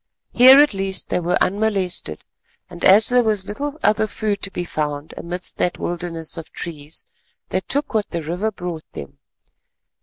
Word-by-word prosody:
Here 260 Hz, +2 st, +9 dB
at 290 Hz, -4 st, +5 dB
least 195 Hz, -1 st, -1 dB
they -, -, 0 dB
were 175 Hz, +1 st, 0 dB
unmolested, 195 Hz, -, 0 dB, 0.5 s
and 175 Hz, 0 st, -10 dB
as 205 Hz, +3 st, +6 dB
there 250 Hz, 0 st, +4 dB
was 215 Hz, -4 st, 0 dB
little 285 Hz, +9 st, -4 dB
other 215 Hz, +1 st, +3 dB
food 210 Hz, -1 st, -2 dB
to 195 Hz, -, -1 dB
be 180 Hz, -2 st, -4 dB
found 150 Hz, -2 st, -4 dB
amid 175 Hz, +1 st, -6 dB
that 180 Hz, -, 0 dB
wilderness 170 Hz, -2 st, -4 dB
of 165 Hz, -, -8 dB
trees, 155 Hz, -2 st, -6 dB, 0.5 s
they -, -, 0 dB
took 285 Hz, -, -2 dB
what 215 Hz, -3 st, 0 dB
the 170 Hz, -2 st, -4 dB
river 180 Hz, +8 st, -2 dB
brought 175 Hz, -5 st, -7 dB
them. 70 Hz, -1 st, -9 dB
185 Hz, 170 wpm, -21 LUFS, 170-215 Hz, 0.5 s, Here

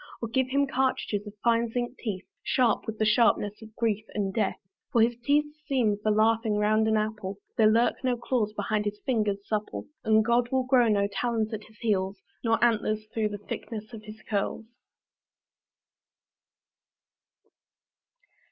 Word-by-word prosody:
Or 230 Hz, -, -4 dB
give 260 Hz, +2 st, +1 dB
him 280 Hz, +2 st, +2 dB
cartridges 255 Hz, -6 st, -1 dB
of 205 Hz, -, -8 dB
fine 235 Hz, 0 st, +3 dB
zinc 245 Hz, +2 st, -3 dB
teeth, 200 Hz, -5 st, -4 dB, 0.2 s
Sharp 245 Hz, -4 st, +1 dB
with 220 Hz, -1 st, -4 dB
the 215 Hz, -, +1 dB
sharpness 210 Hz, -1 st, +2 dB
of 220 Hz, -1 st, -13 dB
grief 220 Hz, -2 st, 0 dB
and 195 Hz, -2 st, -1 dB
death. 205 Hz, -3 st, 0 dB, 0.3 s
For 235 Hz, -5 st, +5 dB
his 235 Hz, +1 st, +2 dB
teeth 295 Hz, +3 st, +3 dB, 0.2 s
seem 245 Hz, -7 st, +2 dB
for 215 Hz, -, +1 dB
laughing 220 Hz, +1 st, +3 dB
round 215 Hz, +1 st, +2 dB
an 220 Hz, 0 st, +3 dB
apple. 215 Hz, -2 st, -3 dB, 0.2 s
There 215 Hz, -1 st, +5 dB
lurk 230 Hz, +4 st, +2 dB
no 250 Hz, -2 st, +1 dB
claws 235 Hz, -3 st, 0 dB
behind 210 Hz, 0 st, -1 dB
his 205 Hz, 0 st, -3 dB
fingers 210 Hz, -6 st, 0 dB
supple; 215 Hz, -1 st, -3 dB, 0.2 s
And 220 Hz, 0 st, +4 dB
God 240 Hz, +1 st, +2 dB
will 260 Hz, -1 st, +2 dB
grow 255 Hz, -2 st, +4 dB
no 200 Hz, -2 st, +2 dB
talons 225 Hz, +1 st, -1 dB
at 215 Hz, -1 st, -5 dB
his 220 Hz, 0 st, -20 dB
heels, 200 Hz, -4 st, 0 dB, 0.3 s
Nor 225 Hz, -1 st, +3 dB
antlers 215 Hz, -2 st, 0 dB
through 220 Hz, -2 st, 0 dB
the 205 Hz, -, -5 dB
thickness 215 Hz, +2 st, -7 dB
of 220 Hz, -, -8 dB
his 215 Hz, +1 st, -11 dB
curls. 205 Hz, +1 st, -2 dB
220 Hz, 160 wpm, -27 LUFS, 210-235 Hz, 0.3 s, For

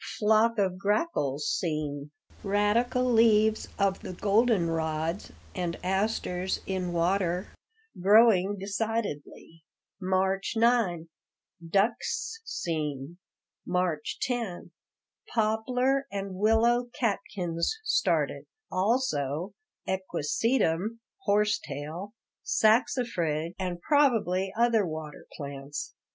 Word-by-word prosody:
Flock 220 Hz, +2 st, +3 dB
of 185 Hz, -3 st, 0 dB
grackles 195 Hz, -, 0 dB
seen. 150 Hz, -3 st, -2 dB, 0.3 s
Radical 210 Hz, +5 st, +2 dB
leaves 220 Hz, -2 st, +4 dB
of 195 Hz, -1 st, +1 dB
the -, -, -7 dB
golden 205 Hz, -1 st, +2 dB
rods 160 Hz, +3 st, -2 dB, 0.2 s
and 175 Hz, -3 st, -3 dB
asters 190 Hz, -1 st, -1 dB
in 185 Hz, -2 st, -2 dB
water, 180 Hz, +1 st, 0 dB, 0.5 s
growing 205 Hz, -1 st, +5 dB
decidedly. 195 Hz, -6 st, -4 dB, 0.4 s
March 190 Hz, +2 st, 0 dB
9 225 Hz, -8 st, +2 dB, 0.6 s
Ducks 225 Hz, -, 0 dB
seen. 155 Hz, -, -4 dB, 0.4 s
March 180 Hz, -4 st, -1 dB
10 235 Hz, -8 st, -3 dB, 0.6 s
Poplar 250 Hz, +5 st, +1 dB
and 195 Hz, -1 st, -4 dB
willow 225 Hz, +5 st, +3 dB
catkins 180 Hz, -7 st, -1 dB
started; 440 Hz, -, +1 dB, 0.3 s
also 185 Hz, -, 0 dB, 0.3 s
equisetum 190 Hz, -, 0 dB, 0.3 s
(horse 210 Hz, 0 st, +3 dB
tail), 165 Hz, -, -7 dB, 0.3 s
saxifrage, 210 Hz, -, +1 dB
and 180 Hz, -2 st, -3 dB
probably 215 Hz, -, +2 dB
other 235 Hz, -2 st, +3 dB
water 155 Hz, -3 st, -6 dB
plants. 140 Hz, 0 st, -6 dB
195 Hz, 85 wpm, -28 LUFS, 170-225 Hz, 0.6 s, growing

